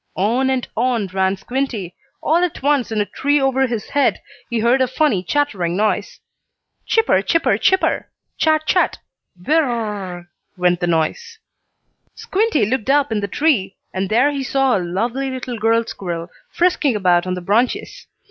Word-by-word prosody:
On 240 Hz, +7 st, +1 dB
and 260 Hz, -2 st, -1 dB
on 235 Hz, -2 st, +1 dB
ran 190 Hz, 0 st, +1 dB
Squinty. 235 Hz, -5 st, -3 dB, 0.3 s
All 320 Hz, -, +3 dB
at 350 Hz, -6 st, -3 dB
once, 280 Hz, -5 st, +1 dB
in 215 Hz, -1 st, 0 dB
a -, -, 0 dB
tree 285 Hz, +8 st, 0 dB
over 265 Hz, -1 st, +2 dB
his 230 Hz, -3 st, -4 dB
head, 285 Hz, -2 st, +2 dB, 0.3 s
he 235 Hz, -, -1 dB
heard 240 Hz, +4 st, +3 dB
a 260 Hz, -, +3 dB
funny 255 Hz, -, +1 dB
chattering 185 Hz, -9 st, -1 dB
noise. 210 Hz, -1 st, -1 dB, 0.7 s
"Chipper, 450 Hz, -, +3 dB
chipper, 330 Hz, +10 st, +2 dB
chipper! 380 Hz, 0 st, +1 dB, 0.3 s
Chat! 310 Hz, -1 st, +2 dB
Chat! 360 Hz, -, +2 dB, 0.5 s
Whir 320 Hz, +1 st, +3 dB
r 260 Hz, -, -1 dB
r 225 Hz, -3 st, -2 dB
r 190 Hz, -3 st, -6 dB
r 175 Hz, 0 st, -12 dB, 0.2 s
!" -, -, -47 dB
went 180 Hz, -1 st, +2 dB
the 175 Hz, -, -1 dB
noise. 450 Hz, -, -1 dB, 0.8 s
Squinty 420 Hz, -, 0 dB
looked 250 Hz, +2 st, -2 dB
up 285 Hz, -2 st, +3 dB
in 220 Hz, -, 0 dB
the 200 Hz, -, -2 dB
tree, 210 Hz, -6 st, +1 dB, 0.2 s
and 190 Hz, 0 st, -2 dB
there 250 Hz, +7 st, +3 dB
he 280 Hz, -1 st, -3 dB
saw 270 Hz, -1 st, +1 dB
a 195 Hz, -, 0 dB
lovely 230 Hz, +10 st, -2 dB
little 255 Hz, -2 st, -5 dB
girl 225 Hz, +1 st, +2 dB
squirrel, 170 Hz, -5 st, -5 dB, 0.2 s
frisking 345 Hz, -7 st, +1 dB
about 180 Hz, -3 st, +2 dB
on 185 Hz, -, -1 dB
the -, -, -4 dB
branches. 235 Hz, -, -1 dB
240 Hz, 175 wpm, -19 LUFS, 195-280 Hz, 0.8 s, All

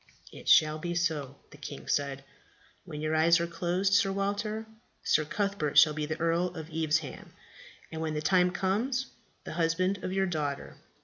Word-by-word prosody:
"It -, -, -7 dB
shall 155 Hz, 0 st, +5 dB
be 175 Hz, +2 st, -3 dB
so," 150 Hz, -6 st, -1 dB, 0.2 s
the -, -, -13 dB
king 145 Hz, -1 st, -9 dB
said. 140 Hz, -1 st, -1 dB, 0.6 s
"When 150 Hz, -, -7 dB
your 155 Hz, +1 st, 0 dB
eyes 165 Hz, +2 st, +5 dB
are 170 Hz, -, 0 dB
closed, 180 Hz, +3 st, -1 dB
Sir 195 Hz, 0 st, +4 dB
Walter, 205 Hz, +3 st, -2 dB, 0.4 s
Sir 155 Hz, -, +2 dB
Cuthbert 200 Hz, -4 st, -1 dB
shall 155 Hz, -1 st, +8 dB
be 150 Hz, 0 st, -4 dB
Earl 165 Hz, +2 st, +1 dB
of 160 Hz, 0 st, -8 dB
Evesham, 155 Hz, -3 st, -2 dB, 0.6 s
and, 160 Hz, 0 st, -5 dB
when 155 Hz, -1 st, -2 dB
the -, -, 0 dB
time 180 Hz, +1 st, +4 dB
comes, 225 Hz, +9 st, -1 dB, 0.3 s
the -, -, -7 dB
husband 185 Hz, +4 st, 0 dB
of 185 Hz, -, -3 dB
your 195 Hz, 0 st, +1 dB
daughter." 150 Hz, -6 st, -3 dB
165 Hz, 170 wpm, -29 LUFS, 155-190 Hz, 0.6 s, shall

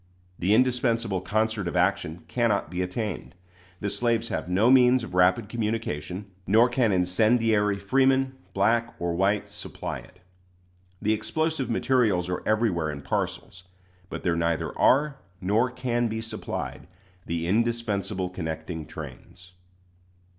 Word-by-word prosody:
The 95 Hz, +4 st, +3 dB
indispensable 115 Hz, -5 st, +1 dB
concert 110 Hz, +1 st, 0 dB
of 85 Hz, -, -3 dB
action 90 Hz, -2 st, 0 dB
cannot 115 Hz, -9 st, 0 dB
be 90 Hz, 0 st, -2 dB
attained. 90 Hz, -1 st, -4 dB, 0.5 s
The 100 Hz, -, -1 dB
slaves 115 Hz, -1 st, 0 dB
have -, -, -3 dB
no 105 Hz, +7 st, +4 dB
means 125 Hz, -1 st, +6 dB
of 115 Hz, -, -8 dB
rapid 90 Hz, +4 st, +3 dB
communication; 105 Hz, -6 st, -3 dB, 0.2 s
nor 115 Hz, +5 st, +5 dB
can 120 Hz, -3 st, +2 dB
incendiary 105 Hz, +3 st, +2 dB
freemen, 130 Hz, +6 st, +2 dB, 0.2 s
black 115 Hz, +4 st, +2 dB
or 85 Hz, 0 st, -2 dB
white, 100 Hz, +4 st, +1 dB
supply -, -, -6 dB
it. -, -, -17 dB, 0.9 s
The 110 Hz, -, +3 dB
explosive 155 Hz, +6 st, -1 dB
materials 115 Hz, -8 st, +2 dB
are 90 Hz, -, -2 dB
everywhere 105 Hz, -8 st, +1 dB
in 70 Hz, -1 st, -6 dB
parcels; 90 Hz, +5 st, -3 dB, 0.4 s
but -, -, -6 dB
there 85 Hz, -2 st, +1 dB
neither 85 Hz, -1 st, -1 dB
are, 145 Hz, +1 st, +3 dB, 0.2 s
nor 105 Hz, +6 st, +2 dB
can 125 Hz, -1 st, -1 dB
be 110 Hz, 0 st, -3 dB
supplied, 110 Hz, -5 st, -5 dB, 0.4 s
the 85 Hz, 0 st, -2 dB
indispensable 105 Hz, -2 st, 0 dB
connecting 80 Hz, -2 st, -5 dB
trains. 90 Hz, 0 st, -10 dB
105 Hz, 130 wpm, -26 LUFS, 90-120 Hz, 0.9 s, means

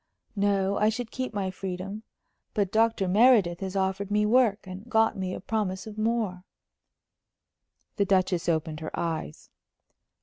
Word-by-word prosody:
"No. 200 Hz, -1 st, +1 dB
I 210 Hz, -, +4 dB
should 230 Hz, +1 st, -4 dB
keep 260 Hz, -1 st, -3 dB
my 195 Hz, -3 st, -2 dB
freedom. 190 Hz, +2 st, -5 dB, 0.5 s
But 200 Hz, -4 st, 0 dB
Dr. 225 Hz, -3 st, +2 dB
Meredith 200 Hz, -4 st, +4 dB
has 190 Hz, 0 st, -5 dB
offered 190 Hz, +1 st, -1 dB
me 210 Hz, 0 st, +2 dB
work, 225 Hz, -3 st, +3 dB
and 190 Hz, +5 st, -9 dB
got 225 Hz, -1 st, +3 dB
me 185 Hz, -1 st, -3 dB
a -, -, -6 dB
promise 195 Hz, -3 st, -2 dB
of 215 Hz, -1 st, -8 dB
more." 215 Hz, -5 st, -1 dB, 1.5 s
The 200 Hz, -, +2 dB
Duchess 185 Hz, -3 st, +1 dB
opened 160 Hz, -1 st, -1 dB
her 155 Hz, -, -5 dB
eyes. 160 Hz, -, -4 dB
200 Hz, 145 wpm, -27 LUFS, 185-220 Hz, 1.5 s, I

